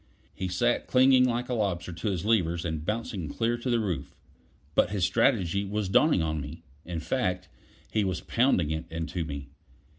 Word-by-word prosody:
He 95 Hz, -, -3 dB
sat 120 Hz, +7 st, +1 dB
clinging 130 Hz, 0 st, +5 dB
like 125 Hz, 0 st, -1 dB
a 125 Hz, -, -2 dB
lobster 95 Hz, -6 st, -1 dB
to 85 Hz, +6 st, -2 dB
his 95 Hz, -2 st, -2 dB
levers 85 Hz, -7 st, +1 dB
and 80 Hz, -2 st, -3 dB
bouncing 105 Hz, -4 st, -3 dB
clear 115 Hz, +1 st, 0 dB
to 125 Hz, -, -3 dB
the 120 Hz, -1 st, +3 dB
roof. 95 Hz, -6 st, -3 dB, 0.6 s
But -, -, +3 dB
his 100 Hz, -3 st, +1 dB
strategy 100 Hz, -3 st, +2 dB
was 100 Hz, 0 st, -2 dB
dawning 125 Hz, -, +4 dB
on 80 Hz, -1 st, -1 dB
me; 80 Hz, +4 st, -8 dB, 0.2 s
in 85 Hz, -2 st, -4 dB
fact, 90 Hz, -4 st, -1 dB, 0.4 s
he 110 Hz, -, +2 dB
was 95 Hz, -2 st, -1 dB
pounding 115 Hz, -, +2 dB
it 80 Hz, +1 st, -3 dB
into 80 Hz, +1 st, -3 dB
me. 70 Hz, -2 st, -6 dB
95 Hz, 180 wpm, -28 LUFS, 85-115 Hz, 0.6 s, clinging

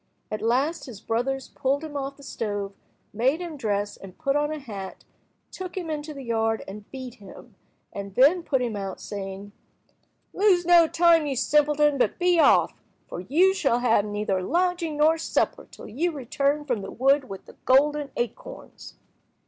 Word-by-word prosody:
At 215 Hz, -, -3 dB
last 270 Hz, +9 st, 0 dB
his 230 Hz, -6 st, -9 dB
brothers 250 Hz, +5 st, -2 dB
pulled 275 Hz, +3 st, -1 dB
him 305 Hz, -2 st, -7 dB
off 275 Hz, 0 st, -4 dB
the 280 Hz, -, -15 dB
stove, 205 Hz, -6 st, -4 dB, 0.4 s
made 260 Hz, +9 st, +1 dB
him 345 Hz, -3 st, -6 dB
dress 205 Hz, -5 st, -2 dB
and 195 Hz, -2 st, -12 dB
put 275 Hz, -3 st, 0 dB
on 295 Hz, +1 st, +1 dB
a 310 Hz, -, -3 dB
hat, 205 Hz, -9 st, -8 dB, 0.5 s
took 370 Hz, -1 st, -7 dB
him 340 Hz, -4 st, -3 dB
into 305 Hz, 0 st, -4 dB
the 275 Hz, -2 st, -8 dB
yard 225 Hz, -2 st, 0 dB
and 205 Hz, +1 st, -10 dB
beat 260 Hz, -3 st, -8 dB
him, 195 Hz, -, -13 dB, 0.4 s
and 200 Hz, -1 st, -7 dB
then 295 Hz, +8 st, +5 dB
put 265 Hz, -6 st, 0 dB
him 235 Hz, -3 st, -2 dB
out, 195 Hz, -2 st, -5 dB
saying— 200 Hz, 0 st, -7 dB, 0.8 s
"Lose 380 Hz, -4 st, +3 dB
no 340 Hz, -1 st, +6 dB
time, 330 Hz, -2 st, +4 dB
you 275 Hz, -, -2 dB
simpleton, 295 Hz, +1 st, +2 dB
but -, -, +1 dB
be 355 Hz, -1 st, +3 dB
off, -, -, +5 dB, 0.3 s
for -, -, -6 dB
you 320 Hz, -, +3 dB
shall 275 Hz, -10 st, +1 dB
have 225 Hz, -4 st, +3 dB
neither 205 Hz, -2 st, -2 dB
lodging 345 Hz, -, 0 dB
nor 315 Hz, +2 st, +4 dB
supper 325 Hz, -, -1 dB
till -, -, -12 dB
you 315 Hz, +11 st, -1 dB
return 285 Hz, +1 st, -1 dB
from 245 Hz, -7 st, -1 dB
the 195 Hz, -, -7 dB
wood 270 Hz, +1 st, +2 dB
with 195 Hz, -1 st, -8 dB
the -, -, -14 dB
golden 290 Hz, +2 st, +3 dB
acorns." 370 Hz, -, -6 dB
275 Hz, 175 wpm, -25 LUFS, 220-310 Hz, 0.8 s, no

